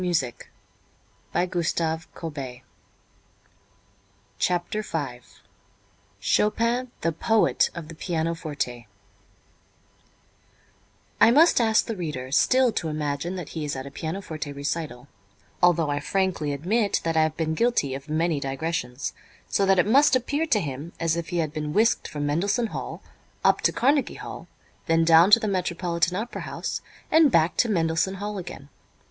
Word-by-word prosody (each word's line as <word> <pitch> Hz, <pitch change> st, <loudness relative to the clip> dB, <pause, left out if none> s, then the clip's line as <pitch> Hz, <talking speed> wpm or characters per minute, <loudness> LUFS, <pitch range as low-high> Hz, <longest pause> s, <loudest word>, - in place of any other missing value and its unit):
With 175 Hz, -5 st, +2 dB
it 120 Hz, -2 st, -9 dB, 0.8 s
they 180 Hz, -, +1 dB
shoot 175 Hz, -2 st, -1 dB
the 160 Hz, -1 st, 0 dB, 0.2 s
musical 165 Hz, -1 st, -4 dB, 2.1 s
chutes. 180 Hz, +4 st, -1 dB
V 125 Hz, -6 st, -5 dB, 0.9 s
CHOPIN, 235 Hz, +4 st, +1 dB
THE 165 Hz, -, +1 dB
POET 220 Hz, +7 st, +2 dB
OF 170 Hz, -3 st, -6 dB
THE 165 Hz, -, -9 dB
PIANOFORTE 160 Hz, -7 st, -3 dB, 2.4 s
I 225 Hz, -, +8 dB
must 295 Hz, +2 st, +5 dB
ask 220 Hz, -1 st, +3 dB
the 225 Hz, -, -4 dB
reader 150 Hz, -8 st, -5 dB
still 255 Hz, -, +4 dB
to 170 Hz, -, -2 dB
imagine 150 Hz, +3 st, -2 dB
that 180 Hz, -5 st, -6 dB
he 160 Hz, -, -5 dB
is 145 Hz, -1 st, -3 dB
at 130 Hz, 0 st, -5 dB
a 140 Hz, -, -8 dB
pianoforte 160 Hz, -1 st, -5 dB
recital, 140 Hz, -2 st, -4 dB, 0.5 s
although 170 Hz, -4 st, +4 dB
I 145 Hz, -, 0 dB
frankly 185 Hz, -3 st, -1 dB
admit 200 Hz, -, 0 dB
that 165 Hz, -1 st, -1 dB
I 160 Hz, -, +5 dB
have 155 Hz, 0 st, 0 dB
been 160 Hz, -1 st, -1 dB
guilty 195 Hz, -, +1 dB
of 140 Hz, +2 st, -7 dB
many 160 Hz, 0 st, +1 dB
digressions, 135 Hz, -2 st, -3 dB, 0.3 s
so 195 Hz, -, +1 dB
that 195 Hz, 0 st, +4 dB
it 180 Hz, -, +4 dB
must 275 Hz, +6 st, +5 dB
appear 285 Hz, +6 st, 0 dB
to 230 Hz, -8 st, +3 dB
him 150 Hz, 0 st, -5 dB
as 165 Hz, -1 st, +1 dB
if 170 Hz, -1 st, -4 dB
he 175 Hz, -, -2 dB
had 155 Hz, -3 st, -1 dB
been 150 Hz, -1 st, -3 dB
whisked 225 Hz, +5 st, +2 dB
from 145 Hz, -1 st, -4 dB
Mendelssohn 200 Hz, +11 st, +1 dB
Hall -, -, -6 dB, 0.4 s
up -, -, +4 dB
to -, -, +3 dB
Carnegie 280 Hz, +2 st, +1 dB
Hall, -, -, -8 dB, 0.4 s
then 165 Hz, 0 st, +3 dB
down 165 Hz, +3 st, +7 dB
to 210 Hz, -, +8 dB
the 220 Hz, -, -2 dB
Metropolitan 180 Hz, -2 st, 0 dB
Opera 230 Hz, +4 st, -4 dB
House -, -, -4 dB, 0.3 s
and 315 Hz, -3 st, +6 dB
back 165 Hz, -2 st, +3 dB
to 240 Hz, -, +3 dB
Mendelssohn 165 Hz, 0 st, +1 dB
Hall 205 Hz, +1 st, -4 dB
again. 145 Hz, -5 st, -9 dB
170 Hz, 155 wpm, -25 LUFS, 150-205 Hz, 2.4 s, I